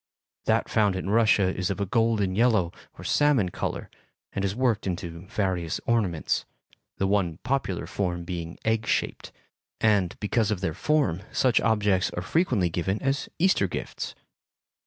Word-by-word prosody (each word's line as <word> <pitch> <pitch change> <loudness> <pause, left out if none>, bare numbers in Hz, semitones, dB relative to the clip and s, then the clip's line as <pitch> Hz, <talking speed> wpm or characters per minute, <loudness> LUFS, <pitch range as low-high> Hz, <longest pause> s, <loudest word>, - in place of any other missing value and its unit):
That - - +2
found 105 -3 +2
in 95 +1 -3
Russia 105 -4 +4
is 90 -1 -1
of 95 -1 -2
a 100 - 0
golden 110 -3 +1
yellow 110 -6 +3 0.3
or - - -9
salmon 145 -10 +3
color, - - -4 0.5
and 100 - -2
is 100 0 -1
worked 120 -5 +1
into 85 -1 -5
various 95 -6 -1
ornaments, 100 -9 +1 0.5
the 95 - +1
one 95 -5 +1
popular 125 -9 -1
form 90 -3 -2
being 85 -1 -5
egg 110 0 +1
shaped, - - -1 0.5
and, 100 -5 +2
because 110 +1 +1
of 105 -4 0
their 80 -5 -1
form, 125 - +1
such 125 -3 +3
objects 105 -4 +2
are 90 - -3
frequently 115 - +1
given 95 +5 -1
as 135 0 0
Easter 190 +3 +3
gifts. - - -5
100 Hz, 155 wpm, -26 LUFS, 90-115 Hz, 0.5 s, Russia